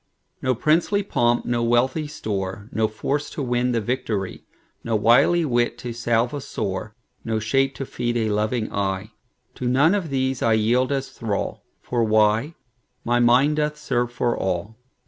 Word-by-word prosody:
No 130 -1 +1
princely 170 - +2
pomp, 120 -10 +1
no 120 -1 0
wealthy 125 +6 +1
store, 105 -7 -4
No 110 0 +1
force 140 +7 -2
to 150 - -4
win 125 0 0
the 120 - +1
victory, 110 -4 -3 0.4
No 115 - -1
wily 120 +10 +4
wit 120 -3 +1
to 120 -1 -6
salve 120 +1 0
a 145 - -4
sore, 105 -1 -4 0.3
No 110 -1 -1
shape 135 +5 +1
to 135 - -4
feed 120 -1 -2
a 110 -2 0
loving 110 +2 -1
eye; 100 +1 -2 0.4
To 125 - -4
none 140 +8 +4
of 195 -6 -1
these 130 -1 -1
I 115 - +3
yield 120 +5 +2
as 135 -1 -1
thrall; 105 -4 -3 0.2
For 120 -2 0
why? 110 +7 +2 0.5
my 120 +1 +2
mind 125 +5 +4
doth 150 0 0
serve 120 -4 -1
for 120 0 0
all. 95 +4 -2
120 Hz, 165 wpm, -23 LUFS, 110-135 Hz, 0.5 s, wily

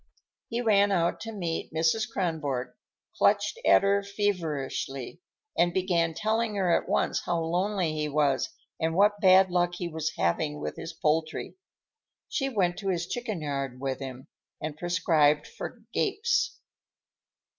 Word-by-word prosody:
He 235 +1 -1
ran 205 -3 +4
out 170 -3 +1
to 225 - -6
meet 175 -6 -3
Mrs. 165 +9 +1
Kronborg, 155 - -2 0.4
clutched 475 - +2
at - - +6
her 200 0 +3
feverishly, 165 - -3 0.3
and 175 0 +2
began 170 -3 +1
telling 220 +1 0
her 185 -4 +3
at - - -2
once - - +1
how 175 -1 0
lonely 175 +1 0
he 150 -1 -2
was 145 -2 +1 0.3
and 160 0 0
what 205 +2 +4
bad 190 -1 +6
luck 175 0 +1
he 175 -1 -3
was 160 -1 -3
having 150 - 0
with - - -4
his 165 - -6
poultry. 160 -1 -1 0.7
She 270 -1 -1
went 185 -8 +1
to 195 - -5
his 175 -2 0
chicken 220 -3 -4
yard 140 -3 -3
with 135 -1 -2
him, 130 -1 -7 0.3
and 155 -1 -4
prescribed 155 -3 +2
for 230 - -8
gapes. 440 +3 +1
175 Hz, 145 wpm, -28 LUFS, 155-200 Hz, 0.7 s, at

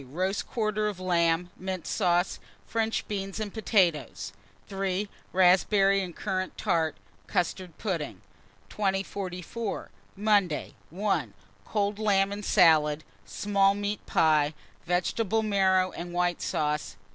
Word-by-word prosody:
Roast 185 +7 -1
quarter 215 -2 0
of 205 -3 -4
lamb, 175 -1 +1
mint 185 -2 -5
sauce, 175 -2 +1 0.3
French 225 0 -1
beans 195 -1 -4
and 210 -2 -4
potatoes. 170 - +1 0.3
3. 195 +1 -2 0.2
Raspberry 195 +2 +4
and 180 -3 -6
currant 185 -2 -3
tart, 160 -2 +1 0.3
custard 180 -2 -2
pudding. 155 - -3 0.5
2044. 195 +1 -3 0.2
Monday. 200 -6 +1 0.2
1. 200 +5 -1 0.3
Cold 205 -1 -1
lamb 200 -2 +2
and 205 +1 -5
salad, 155 -6 +4 0.2
small 200 -1 +2
meat 205 0 -3
pie, 155 -1 +3 0.3
vegetable 205 +5 +1
marrow 190 -3 +3
and 175 +1 -7
white 175 -1 0
sauce. 150 -7 -1
190 Hz, 110 wpm, -28 LUFS, 175-205 Hz, 0.5 s, Raspberry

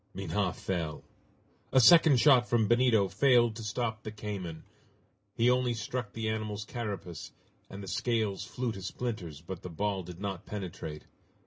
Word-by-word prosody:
Minha 95 +1 -1
fell. 85 -5 -3 0.7
A 130 - +5
second 155 +1 +7
shot 125 -3 +5
from 115 -3 +3
Benito 120 -3 +4
failed 120 +3 +3
to 115 - -7
stop 110 +1 -2
the 110 - -6
cayman. 100 -6 -6 0.7
He 115 - +2
only 125 -1 +2
struck 115 0 -4
the 110 -1 -3
animal's 110 -1 -3
carapace, 100 -8 -6 0.4
and 100 +1 -8
the - - -8
scales 110 -3 -1
flew 125 +4 -3
to 100 -3 -7
splinters 95 - -5
but 90 +2 -7
the 90 - -7
ball 100 +3 -1
did 90 0 -10
not 95 -3 -5
penetrate. 90 -6 -6
105 Hz, 155 wpm, -30 LUFS, 95-120 Hz, 0.7 s, second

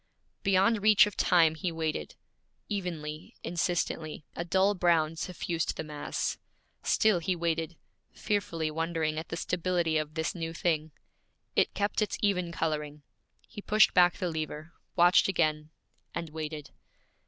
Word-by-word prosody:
Beyond 200 +2 +3
reach 215 0 +7
of 210 - -6
time 165 -3 +4
he 165 +3 -3
waited. 160 - -3 0.5
Evenly, 160 -6 -5
insistently, 165 -3 -2
a 170 - -2
dull 190 +4 +3
brown 165 -4 +2
suffused 165 0 -3
the - - -3
mass. 150 -1 -3 0.4
Still 215 -5 +3
he 180 +2 -1
waited, 165 -1 -2 0.3
fearfully 165 -6 -2
wondering 160 -1 -1
at 160 - -8
the 165 - -4
stability 170 -2 0
of 155 0 -5
this 160 0 -1
new 165 -2 -4
thing. 160 -2 0 0.6
It - - +2
kept 205 +2 0
its 215 - -1
even 180 -4 +1
coloring. 150 -3 -3 0.4
He 205 - -9
pushed 215 +1 +4
back 180 -1 +5
the 180 -2 -2
lever, 155 0 -5 0.2
watched 175 +1 +5
again, 155 -4 0 0.5
and 170 -2 -4
waited. 155 -1 -6
165 Hz, 140 wpm, -29 LUFS, 155-180 Hz, 0.6 s, reach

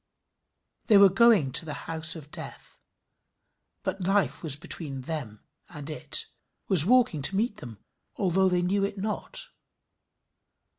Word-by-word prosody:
They 215 - +6
were 200 -1 +7
going 195 - +3
to 165 - +5
the 155 -2 -7
house 160 0 -1
of 150 -2 -12
death, - - -10 1.0
but 195 - -4
Life 195 +2 0
was 155 -5 -1
between 145 -2 -6
them 130 -7 -6 0.3
and 150 -2 -8
it 150 - 0 0.4
was 180 -4 +7
walking 245 - +3
to 170 +8 -1
meet 215 +1 -1
them, 115 -3 -10 0.4
although 190 0 +1
they 180 -1 0
knew 195 +3 0
it 200 +1 -3
not. 360 - -3
180 Hz, 140 wpm, -26 LUFS, 150-200 Hz, 1.0 s, were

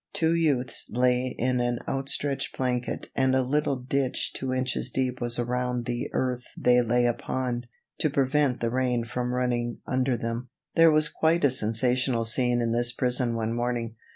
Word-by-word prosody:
Two 160 0 +2
youths 145 -7 +1
lay 125 +1 +1
in 125 +1 +1
an 120 0 0
outstretched 135 +1 -1
blanket 125 -2 -2
and 130 0 +2
a 130 - +3
little 145 +2 0
ditch 130 +1 -1
two 130 -1 -3
inches 130 -1 -1
deep 125 0 -2
was 120 0 0
around 125 0 -1
the 120 0 -3
earth 125 -1 -2
they 125 0 +4
lay 120 +1 +2
upon, 120 0 -2 0.3
to 155 - +2
prevent 140 -1 +1
the 115 -1 0
rain 125 -2 0
from 125 +1 -3
running 120 -1 -1
under 130 -1 0
them. 115 +2 -4 0.2
There 165 0 +6
was 155 -1 +4
quite 160 +1 +2
a 140 - +4
sensational 120 +1 +1
scene 120 +1 +2
in 115 -1 0
this 120 +1 +1
prison 125 -1 0
one 115 0 -1
morning. 120 -1 -2
125 Hz, 170 wpm, -27 LUFS, 120-130 Hz, 0.3 s, There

